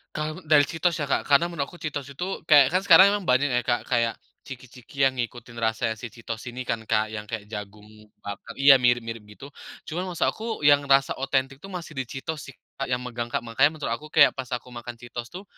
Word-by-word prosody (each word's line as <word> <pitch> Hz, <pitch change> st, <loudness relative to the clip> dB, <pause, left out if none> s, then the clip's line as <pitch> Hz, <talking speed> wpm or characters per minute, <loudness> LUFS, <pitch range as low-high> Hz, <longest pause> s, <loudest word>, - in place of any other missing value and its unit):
Kalau, 155 Hz, +2 st, -3 dB
dari 150 Hz, -2 st, +6 dB
Cheetos 165 Hz, +1 st, 0 dB
ya 145 Hz, -, -1 dB
Kak. 140 Hz, -, 0 dB
Karena, 145 Hz, +3 st, +5 dB
menurut 140 Hz, -5 st, -3 dB
aku 175 Hz, -, -13 dB
Cheetos 145 Hz, -3 st, -4 dB
itu, 140 Hz, +6 st, -5 dB, 0.2 s
kayak, 145 Hz, -3 st, +7 dB
kan 185 Hz, +1 st, +2 dB
sekarang 190 Hz, +2 st, +8 dB
memang 205 Hz, -2 st, -2 dB
banyak 130 Hz, +3 st, +3 dB
ya -, -, -6 dB
Kak. 120 Hz, -1 st, +1 dB
Kayak, 115 Hz, -2 st, +1 dB, 0.3 s
chiki-chiki 130 Hz, +1 st, -6 dB
yang 130 Hz, -1 st, +2 dB
ngikutin 120 Hz, 0 st, -5 dB
rasa 110 Hz, 0 st, 0 dB
si 125 Hz, -, -6 dB
Cheetos 115 Hz, 0 st, -7 dB
ini 125 Hz, +1 st, -5 dB
kan, 115 Hz, -2 st, -2 dB
Kak, 110 Hz, -1 st, +1 dB
yang 105 Hz, -1 st, -6 dB
kayak, 115 Hz, -2 st, -5 dB
jagung 105 Hz, 0 st, -8 dB, 0.4 s
bakar 100 Hz, +3 st, -8 dB
iya, 135 Hz, -1 st, +7 dB
mirip-mirip 120 Hz, -2 st, +1 dB
gitu. 135 Hz, +7 st, -12 dB, 0.3 s
Cuman, 180 Hz, +4 st, -4 dB
maksud 175 Hz, -3 st, -2 dB
aku, 225 Hz, -, -8 dB, 0.2 s
yang 145 Hz, 0 st, +5 dB
rasa 135 Hz, 0 st, +4 dB
otentik 135 Hz, 0 st, -1 dB
itu, 195 Hz, -, -11 dB
masih 175 Hz, -5 st, -7 dB
di 130 Hz, -, -2 dB
Cheetos 150 Hz, +4 st, -6 dB
sih -, -, -23 dB, 0.2 s
Kak, 135 Hz, -, -2 dB
yang 125 Hz, -1 st, -1 dB
megang 120 Hz, -1 st, -4 dB
Kak. 120 Hz, -, -3 dB
Makanya, 120 Hz, +5 st, +3 dB
menurut 150 Hz, -6 st, -4 dB
aku, 135 Hz, +7 st, -4 dB
kayak, 150 Hz, -2 st, +6 dB
pas 130 Hz, -2 st, -6 dB
aku 125 Hz, +1 st, -9 dB
makan 120 Hz, 0 st, -8 dB
Cheetos 120 Hz, 0 st, -8 dB
tuh. 180 Hz, +8 st, -9 dB
130 Hz, 225 wpm, -25 LUFS, 115-150 Hz, 0.4 s, sekarang